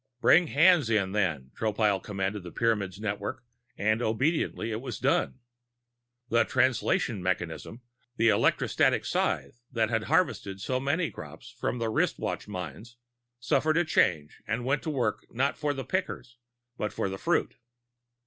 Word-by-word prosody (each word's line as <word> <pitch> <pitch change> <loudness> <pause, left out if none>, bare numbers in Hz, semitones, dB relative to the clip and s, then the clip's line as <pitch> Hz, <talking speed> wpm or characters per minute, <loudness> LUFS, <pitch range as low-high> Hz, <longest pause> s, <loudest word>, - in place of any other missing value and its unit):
Bring 170 +6 +5
hands 155 -3 +5
in, 100 -4 +1
then! 80 -11 -1
Tropile 105 -3 +1
commanded 100 0 -3
the 90 -1 -9
Pyramids' 105 -4 0
network 105 +2 -4 0.3
and 110 +2 +1
obediently 120 0 0
it 110 +1 -3
was 125 -2 -5
done. 135 0 +1 0.9
The 115 0 +4
Translation 130 - +1
mechanism, 90 +5 -3 0.3
the 115 -1 +4
electrostatic - - +2
scythe 120 - -1
that 115 -2 0
had 115 -1 0
harvested 145 - 0
so 130 +6 -1
many 150 +5 0
crops - - -10
from - - -2
the 115 -1 -1
wristwatch 110 - -1
mines, 90 - -7 0.4
suffered 155 +6 +1
a 175 - +3
change 80 - +1
and 115 +3 -2
went 135 +2 +1
to - - -4
work 135 -5 -1
not 135 +4 0
for 150 -1 -1
the 135 -2 -5
pickers 130 -10 -3 0.4
but 105 - -2
for - - -2
the 95 0 -5
fruit. - - 0
115 Hz, 150 wpm, -28 LUFS, 100-135 Hz, 0.9 s, Bring